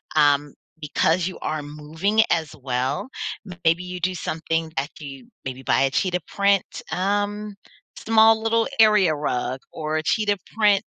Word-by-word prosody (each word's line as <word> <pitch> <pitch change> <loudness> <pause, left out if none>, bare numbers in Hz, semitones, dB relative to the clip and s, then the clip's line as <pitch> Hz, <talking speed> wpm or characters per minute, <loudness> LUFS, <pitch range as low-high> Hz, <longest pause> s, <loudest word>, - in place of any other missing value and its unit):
um, 145 -1 +3 0.3
because 160 +3 +1
you 185 - -6
are 155 -1 -2
moving 155 +8 0
as 160 -3 0
well. 130 - -1 0.6
Maybe 165 +2 +3
you 180 0 -6
do 185 +1 -1
something 165 -1 -2
that 140 +2 -1
you 135 -4 -9 0.2
maybe, 130 0 -5
buy - - +2
a 135 0 +2
cheetah 180 +4 0
print, 200 -1 +2 0.3
um, 205 +2 -1 0.4
small 225 0 +4
little 225 0 +2
area 210 -6 +6
rug 130 -3 -2
or 155 0 -3
a 155 - -2
cheetah 205 +4 +1 0.2
print 210 -3 +4
165 Hz, 150 wpm, -23 LUFS, 150-205 Hz, 0.6 s, area